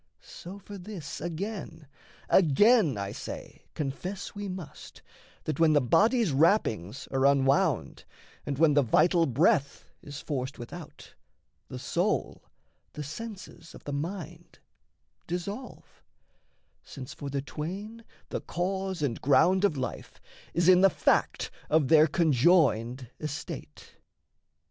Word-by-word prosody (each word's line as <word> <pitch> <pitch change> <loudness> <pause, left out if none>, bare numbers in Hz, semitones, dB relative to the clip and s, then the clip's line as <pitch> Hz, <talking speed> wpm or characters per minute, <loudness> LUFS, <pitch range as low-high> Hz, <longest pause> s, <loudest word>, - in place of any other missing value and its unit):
So 185 +3 -10
for 200 0 -10
this, 180 -6 -7
Again, 170 -2 -5 0.4
again, 190 - +4
I 100 0 -3
say - - -8
confess 180 +7 -4
we 205 0 -5
must, 185 -5 -9 0.4
That, 155 - -3
when 160 -2 +5
the 145 - +5
body's 215 - +3
wrappings 135 - +1
are 135 0 0
unwound, 135 -1 +2 0.4
And 140 -2 -3
when 155 0 +4
the 145 - +5
vital 165 - +3
breath 140 +2 +1
is 145 0 -8
forced 135 -2 -4
without, 150 +7 -10 0.5
The - - -7
soul, - - -1 0.5
the 150 - -5
senses 185 0 -9
of - - -13
the 145 - -5
mind 165 +4 -6 0.7
dissolve, 200 +9 -6 0.8
Since 130 -3 -9
for 140 - -7
the 140 0 -3
twain 195 +11 -6 0.3
the - - -3
cause 190 -1 -3
and 120 -5 -2
ground 180 +7 +4
of 195 -8 +2
life 130 - -5 0.4
Is 175 0 +2
in 185 0 +7
the 195 - +7
fact - - +1 0.2
of 150 -3 +3
their 155 -1 +7
conjoined 135 - +2
estate. 150 -1 -7
160 Hz, 125 wpm, -28 LUFS, 140-190 Hz, 0.8 s, in